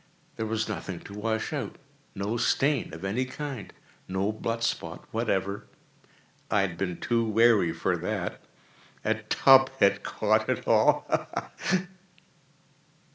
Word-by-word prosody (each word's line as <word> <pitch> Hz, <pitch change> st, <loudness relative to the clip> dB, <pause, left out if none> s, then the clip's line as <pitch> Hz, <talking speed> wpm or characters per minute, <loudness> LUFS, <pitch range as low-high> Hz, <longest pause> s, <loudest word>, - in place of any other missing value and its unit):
There 110 Hz, -, -3 dB
was 110 Hz, 0 st, -1 dB
nothing 95 Hz, -3 st, -5 dB
to 100 Hz, -, -11 dB
wash 110 Hz, +1 st, -2 dB
out—no 100 Hz, +4 st, -5 dB
stain 140 Hz, -, +1 dB
of 80 Hz, +4 st, -7 dB
any 110 Hz, +7 st, 0 dB
kind—no 115 Hz, -7 st, -5 dB
blood 115 Hz, +1 st, -3 dB
spot -, -, -3 dB
whatever. 100 Hz, +1 st, -1 dB, 0.8 s
I 105 Hz, -, +3 dB
had 95 Hz, -3 st, -1 dB
been 90 Hz, -1 st, -3 dB
too 115 Hz, -1 st, +1 dB
wary 110 Hz, -5 st, +4 dB
for -, -, 0 dB
that. -, -, -3 dB, 0.6 s
A -, -, +3 dB
tub 135 Hz, -1 st, +5 dB
had 100 Hz, -4 st, +4 dB
caught -, -, 0 dB
all—ha! -, -, +2 dB
ha! 185 Hz, -1 st, +1 dB
110 Hz, 120 wpm, -28 LUFS, 95-120 Hz, 0.8 s, tub